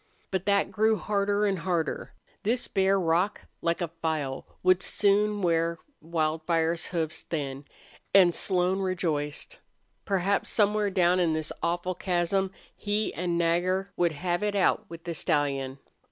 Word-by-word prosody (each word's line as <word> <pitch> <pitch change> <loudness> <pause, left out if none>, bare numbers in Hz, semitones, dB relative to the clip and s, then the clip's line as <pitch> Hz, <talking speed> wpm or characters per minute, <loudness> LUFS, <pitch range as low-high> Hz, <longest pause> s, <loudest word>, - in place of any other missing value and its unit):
But 190 0 -2
that 200 -1 +2
grew 220 +1 +3
harder 205 0 0
and 195 -3 0
harder. 165 -2 -2 0.3
This 235 +4 0
bare 195 0 +2
rock, 180 +4 +1 0.2
like 170 +1 0
a 175 - 0
file, 150 -5 -2 0.2
would 185 0 +4
soon 205 +1 +2
wear 165 -1 +1 0.2
Wildfire's 165 +1 0
hoofs 160 -3 -3
thin. 140 -3 -4 0.5
And 185 -3 +6
Slone 185 +1 +1
rejoiced. 175 - -2 0.4
Perhaps 195 0 0
somewhere 210 -1 +2
down 180 -1 +3
in 170 -3 +2
this 155 0 -2
awful 175 +2 -1
chasm 185 +2 0 0.3
he 210 +1 -1
and 175 0 -1
Nagger 180 +3 +1
would 170 -2 +2
have 175 +4 -1
if 210 -1 0
out 190 -2 +2
with 165 0 -9
the 170 - -4
stallion. 140 -4 0
175 Hz, 140 wpm, -28 LUFS, 165-195 Hz, 0.5 s, And